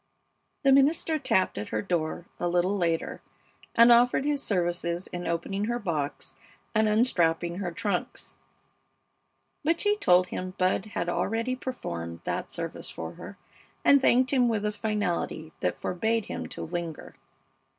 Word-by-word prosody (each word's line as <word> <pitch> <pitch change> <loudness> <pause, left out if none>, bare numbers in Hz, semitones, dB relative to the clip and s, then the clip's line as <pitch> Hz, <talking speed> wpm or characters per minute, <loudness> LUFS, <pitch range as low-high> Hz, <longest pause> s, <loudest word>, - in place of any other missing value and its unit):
The 275 - +5
minister 305 +3 +3
tapped 185 - +1
at 105 - -5
her 110 0 -2
door 170 -1 -2
a 175 - 0
little 180 +3 +1
later 170 -4 -1 0.5
and 235 +1 +8
offered 245 +3 +5
his 290 -1 +1
services 175 -3 -1
in 175 0 -6
opening 185 +5 -1
her 240 +2 -1
box 160 -9 -3 0.4
and 220 -1 +3
unstrapping 175 -6 +2
her 180 -3 -2
trunks; 185 +1 -3 1.3
but 330 +3 +2
she 415 0 +2
told 180 - +4
him 185 0 -5
Bud 185 +1 +1
had 205 -4 -3
already 225 +7 0
performed 85 - -5
that - - -3
service - - -5
for 80 0 -6
her, 200 - -10 0.5
and 280 -1 +7
thanked 255 0 +4
him 250 -3 +4
with 215 -2 -1
a 210 - +1
finality 205 -7 -2
that - - -1
forbade 220 +4 0
him - - -5
to - - -6
linger. 170 -2 -5
195 Hz, 150 wpm, -27 LUFS, 170-235 Hz, 1.3 s, and